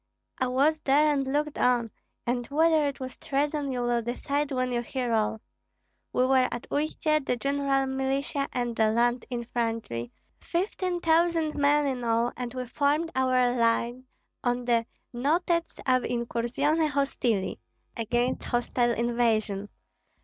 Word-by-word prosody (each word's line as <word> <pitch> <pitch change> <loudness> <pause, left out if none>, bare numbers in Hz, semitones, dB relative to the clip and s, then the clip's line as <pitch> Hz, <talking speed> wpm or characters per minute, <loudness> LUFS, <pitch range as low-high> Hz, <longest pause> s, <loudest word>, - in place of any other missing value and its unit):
"I 255 - +1
was 285 +5 +2
there 295 +2 +4
and 275 -2 -1
looked 300 +1 -1
on, 240 -3 +2 0.3
and 245 0 -1
whether 315 0 +3
it 280 - -4
was 260 -1 -6
treason 285 0 -1
you 250 -1 -2
will 240 -1 +1
decide 280 +5 -2
when 255 -1 0
you 240 -1 0
hear 245 0 -2
all. 220 0 0 0.7
We 255 - +2
were 260 -1 +4
at 240 - -5
Uistsie, 305 0 0
the 250 - 0
general 275 +1 0
militia 270 +1 -1
and 240 -2 -2
the 220 -1 +3
land 240 +2 +1
infantry, 230 - -3 0.3
fifteen 360 0 -2
thousand 330 -1 +2
men 290 +1 +3
in 260 -3 -2
all, 230 +1 +1
and 245 -1 -4
we 255 0 -3
formed 295 +6 0
our 255 -1 +2
lines 235 +1 +1 0.4
on 245 0 0
the 235 -1 +2 0.3
Notets 335 +7 0
ab 255 -1 +3
incursione 245 +7 0
hostili 260 -7 0 0.4
(against 240 +2 -1
hostile 240 0 +1
invasion). 225 -4 0
255 Hz, 140 wpm, -27 LUFS, 240-285 Hz, 0.7 s, there